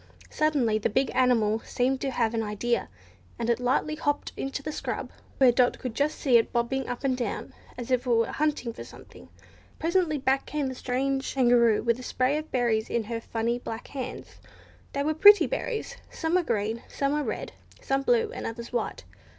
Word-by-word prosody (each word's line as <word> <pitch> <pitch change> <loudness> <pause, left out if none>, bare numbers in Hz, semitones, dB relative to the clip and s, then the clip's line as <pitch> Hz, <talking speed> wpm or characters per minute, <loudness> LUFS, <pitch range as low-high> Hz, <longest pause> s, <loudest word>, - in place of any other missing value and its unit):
Suddenly 275 -8 +1
the 215 - 0
big 265 +5 +1
animal 225 -4 +3
seemed 260 +3 -1
to 275 - -1
have 235 -3 0
an 225 - 0
idea, 220 +3 -1 0.5
and 235 0 0
it 235 - 0
lightly 255 +5 +1
hopped 290 -2 -1
off - - -28
into 275 +1 -3
the 305 - -3
scrub, - - -4 0.3
where 260 -2 +6
Dot 245 +1 +2
could 250 -3 -5
just 290 +5 0
see 255 -4 +4
it 225 - +1
bobbing 245 +3 -1
up 245 - -5
and 265 -2 +1
down 250 -1 -4 0.2
as 245 0 -6
if 250 0 +1
it - - 0
were 230 -1 +4
hunting 295 -6 -1
for - - -8
something. - - -14 0.5
Presently 335 -2 +1
back 270 0 0
came 300 -2 -2
the 260 - -2
strange 270 +2 -2
Kangaroo 240 -4 +4
with 235 +1 +1
a - - -7
spray 255 +2 0
of 310 - -9
berries 235 -4 +1
in 235 - 0
her 230 +1 -4
funny 230 +1 -2
black 225 -1 -7
hands. 260 -2 -7 0.5
They 280 - 0
were 310 +2 +1
pretty 410 +6 +8
berries. - - -3
Some 325 0 -3
were 365 - +4
green, 225 -5 -1
some 275 0 -1
were 300 - +1
red, - - -4 0.3
some 270 0 0
blue, 460 - +2
and - - -5
others 235 +1 -7
white. 240 - -2
255 Hz, 200 wpm, -27 LUFS, 235-285 Hz, 0.5 s, pretty